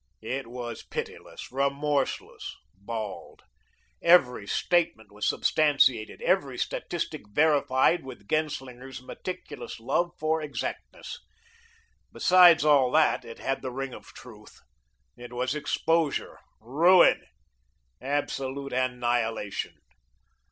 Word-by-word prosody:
It 135 -1 -4
was 120 0 -6
pitiless, - - -7
remorseless, 140 +1 -1 0.2
bald. 105 +1 -7 0.6
Every 130 - +4
statement 135 - 0
was 105 0 -3
substantiated, 135 -7 +2
every - - +1
statistic - - -3
verified 145 +4 +3
with 125 -6 -11
Genslinger's 135 -4 -3
meticulous 180 -1 -7
love 140 +9 0
for 155 +1 0
exactness. 150 -2 -6 0.9
Besides 175 -4 +6
all 140 -4 +5
that, 160 - +3
it 115 - -10
had 135 - -2
the 130 - -4
ring 135 +1 -5
of - - -11
truth. 105 -4 -14 0.6
It 120 0 -11
was 125 +2 -1
exposure, 155 0 0 0.2
ruin, 165 +11 +5 0.8
absolute 140 0 -3
annihilation. 120 -4 -1
135 Hz, 95 wpm, -27 LUFS, 120-150 Hz, 0.9 s, Besides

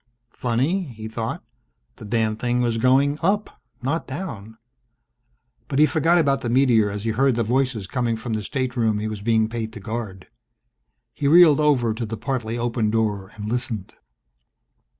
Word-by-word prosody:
Funny, 135 +11 0
he 110 0 -7
thought, 110 0 -4 0.5
the - - -10
damned 110 0 0
thing 120 0 0
was 120 -2 0
going 135 +4 +3
up, 205 +5 -1 0.2
not 145 +6 -1
down. 115 - -7 1.1
But 135 - -3
he 150 - +7
forgot 165 +2 +2
about 140 -5 +2
the 120 - -3
meteor 120 -4 +4
as 100 0 -5
he 115 - 0
heard 130 +3 +2
the 115 - +1
voices 125 -2 0
coming 120 +3 -1
from 110 +1 -5
the 110 - -1
stateroom 120 -3 -1
he 105 +1 -2
was 110 -2 -5
being 110 0 +2
paid 110 -1 -4
to - - -8
guard. 105 -3 -6 0.9
He 140 - -1
reeled 160 -1 +7
over 135 -7 +2
to 115 +1 -4
the 115 +1 -5
partly 115 0 -3
opened 115 -2 -1
door 105 -4 0
and 105 -1 -6
listened. 115 -4 -3
120 Hz, 170 wpm, -23 LUFS, 110-135 Hz, 1.1 s, he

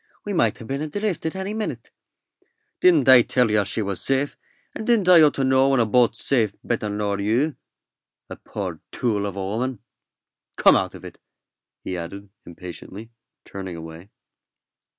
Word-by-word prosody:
"We 205 - -3
might 115 - +1
ha' 115 - -10
been 135 +4 -4
adrift 180 +3 -2
any 190 +2 -4
minute." 210 - -5 0.9
"Didn't 165 -8 +4
I 130 -2 +9
tell 125 -1 +1
yer 105 -1 +3
she 105 +3 -2
was 100 -2 -3
safe, 135 +1 0 0.4
and 220 - -6
didn't 230 -6 +3
I 180 -3 +8
ought 150 -2 +5
to 135 - -1
know 130 +1 +3
when 135 -2 +2
a 115 - +3
boat's 115 0 +2
safe 110 -7 +1
better 115 -3 -2
nor 105 -1 -2
you 120 +9 0 0.7
a - - -8
poor - - -6
tool 105 -4 -1
of 100 - -6
a 95 -1 -4
woman? 120 +6 -2 0.8
Come - - +5
out - - -1
of - - -11
it," - - -11 0.6
he 90 - -4
added, 100 +4 -8 0.2
impatiently, 90 +5 -10 0.3
turning 95 -2 -7
away. 80 +3 -10
115 Hz, 170 wpm, -23 LUFS, 100-140 Hz, 0.9 s, I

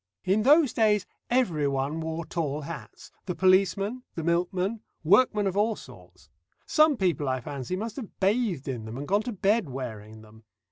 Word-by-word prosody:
In 195 +3 +2
those 290 +3 +5
days 210 -3 +2 0.2
everyone 150 - 0
wore 160 +1 -4
tall 155 -3 -2
hats 165 +2 -9 0.2
the 180 - -2
policeman, 195 +5 +2
the 165 - -4
milkman, 180 +5 0 0.2
workmen 210 +4 +4
of 190 -1 -1
all 215 +2 +2
sorts. - - -15 0.3
Some 305 -3 +4
people 170 -8 0
I 130 0 0
fancy 140 +6 -5
must 220 +6 -5
have 240 -7 -8
bathed 195 - +1
in 120 -5 -4
them 110 +2 -7
and 145 +1 -6
gone 205 +2 +2
to 245 - -4
bed 205 -3 +1
wearing 110 -4 -7
them. 110 +1 -17
185 Hz, 170 wpm, -27 LUFS, 145-215 Hz, 0.3 s, those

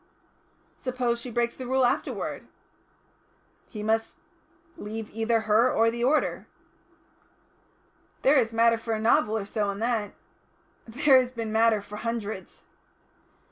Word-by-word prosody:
"Suppose 245 -2 -2
she 250 - -6
breaks 235 0 -1
the 255 - -7
Rule 260 0 +2
afterwards?" - - -2 1.2
"He 210 -3 -7
must 225 +1 -1 0.6
leave 220 +1 -7
either 225 +1 0
her 220 +3 +3
or 230 +1 +3
the 235 +1 -4
order." 290 +5 +1 1.8
"There 275 +2 +5
is 225 -2 0
matter 230 0 +3
for 225 0 -3
a - - -3
novel 220 -1 +2
or 205 - -4
so 205 0 -2
in 200 - -4
that." 220 -2 -2 0.7
"There 265 +3 +4
has 255 0 -2
been 225 -2 -4
matter 220 -1 +3
for 210 +1 -9
hundreds." 220 -3 -5
230 Hz, 135 wpm, -26 LUFS, 220-240 Hz, 1.8 s, There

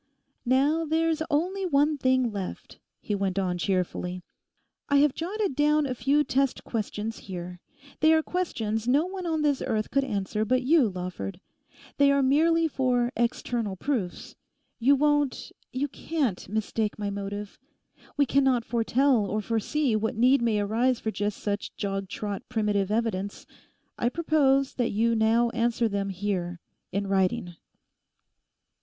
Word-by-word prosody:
'Now 285 +6 +3
there's 320 0 +1
only 360 +6 0
one 300 -3 +2
thing 255 -3 +2
left,' 195 -3 -6 0.2
he 210 - -3
went 195 -1 -1
on 180 -2 0
cheerfully. 180 -1 -2 0.7
'I 285 - +3
have 285 -1 +4
jotted 390 -1 -2
down 300 +1 +3
a 260 - -2
few 275 +5 +2
test 275 -2 0
questions 220 0 -4
here; 180 -1 -6 0.4
they 315 +1 +5
are 320 0 +4
questions 225 -12 -2
no 285 +6 +3
one 370 -1 -5
on 320 -2 0
this 285 -3 +1
earth 220 -4 -1
could 275 0 +2
answer 210 -3 -2
but 255 +4 +1
you, 280 -3 +4
Lawford. 180 0 -5 0.6
They 280 0 +5
are 280 -1 +3
merely 325 +5 +3
for 250 -4 +1
external 235 -3 -1
proofs. 205 -5 -3 0.4
You 270 +4 +5
won't, 290 -1 +1 0.2
you 265 +3 -1
can't, 275 - -2
mistake 215 0 -1
my 205 -1 -3
motive. 200 +1 -6 0.6
We 285 - +4
cannot 265 -3 +2
foretell 235 0 +2
or 210 +2 -1
foresee 230 +4 0
what 220 +2 -1
need 250 +4 +4
may 225 -3 +1
arise 230 +5 +1
for 220 - -2
just 205 -1 -2
such 205 0 -4
jog 195 -2 -3
trot 205 0 -4
primitive 210 -4 0
evidence. 210 -3 -2 0.5
I 240 - +2
propose 275 -3 +2
that 245 -2 0
you 230 +3 +1
now 230 +1 +3
answer 235 0 +1
them 200 -2 -2
here, 185 -2 -3 0.3
in 200 +1 -1
writing. 190 -1 0
235 Hz, 150 wpm, -27 LUFS, 205-280 Hz, 0.7 s, they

